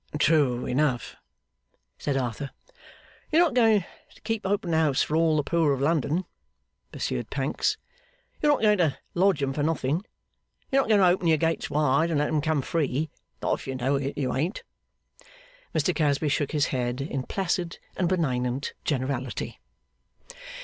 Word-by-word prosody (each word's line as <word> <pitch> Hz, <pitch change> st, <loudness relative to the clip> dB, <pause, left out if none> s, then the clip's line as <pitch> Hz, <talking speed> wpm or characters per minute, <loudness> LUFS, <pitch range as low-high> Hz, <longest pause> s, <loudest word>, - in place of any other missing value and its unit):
'True 145 Hz, -5 st, +3 dB
enough,' 130 Hz, -1 st, 0 dB, 0.8 s
said 140 Hz, -2 st, -1 dB
Arthur. 130 Hz, +2 st, -3 dB, 0.8 s
'You're 325 Hz, +3 st, +6 dB
not 325 Hz, -7 st, +1 dB
going 220 Hz, -6 st, +4 dB, 0.3 s
to -, -, -19 dB
keep 225 Hz, -3 st, -2 dB
open 190 Hz, -4 st, 0 dB
house 155 Hz, -4 st, +3 dB
for 155 Hz, -, -2 dB
all 160 Hz, -1 st, +3 dB
the 150 Hz, -, +1 dB
poor 160 Hz, -1 st, +2 dB
of 135 Hz, -, -2 dB
London,' 155 Hz, +4 st, +1 dB, 0.7 s
pursued -, -, -3 dB
Pancks. -, -, 0 dB, 0.6 s
'You're 295 Hz, -, +4 dB
not 275 Hz, -, -1 dB
going 210 Hz, -2 st, +4 dB
to 155 Hz, -6 st, +2 dB, 0.2 s
lodge 180 Hz, -5 st, +2 dB
'em 135 Hz, 0 st, 0 dB
for 145 Hz, -, -2 dB
nothing. 155 Hz, +2 st, 0 dB, 0.7 s
You're 275 Hz, 0 st, +4 dB
not 265 Hz, -, -4 dB
going 210 Hz, -2 st, +5 dB
to -, -, +6 dB
open 175 Hz, 0 st, +2 dB
your 160 Hz, -1 st, +5 dB
gates 165 Hz, +1 st, 0 dB
wide 150 Hz, +2 st, +2 dB
and 160 Hz, -, +1 dB
let 150 Hz, +1 st, +1 dB
'em 155 Hz, -1 st, +1 dB
come 155 Hz, -2 st, 0 dB
free. 150 Hz, -1 st, -1 dB, 0.3 s
Not -, -, +2 dB
if -, -, -11 dB
you 135 Hz, -, -3 dB
know 130 Hz, +2 st, +1 dB
it, 140 Hz, 0 st, -3 dB
you 130 Hz, -3 st, -1 dB
ain't.' 165 Hz, -, -2 dB, 1.1 s
Mr -, -, +2 dB
Casby 150 Hz, -1 st, +1 dB
shook 145 Hz, 0 st, 0 dB
his 150 Hz, -2 st, +1 dB
head, 125 Hz, 0 st, -1 dB
in 135 Hz, -1 st, -3 dB
Placid 175 Hz, +2 st, -2 dB, 0.2 s
and 180 Hz, -2 st, 0 dB
benignant 130 Hz, -6 st, -1 dB
generality. 130 Hz, -2 st, -2 dB
150 Hz, 165 wpm, -26 LUFS, 135-175 Hz, 1.1 s, You're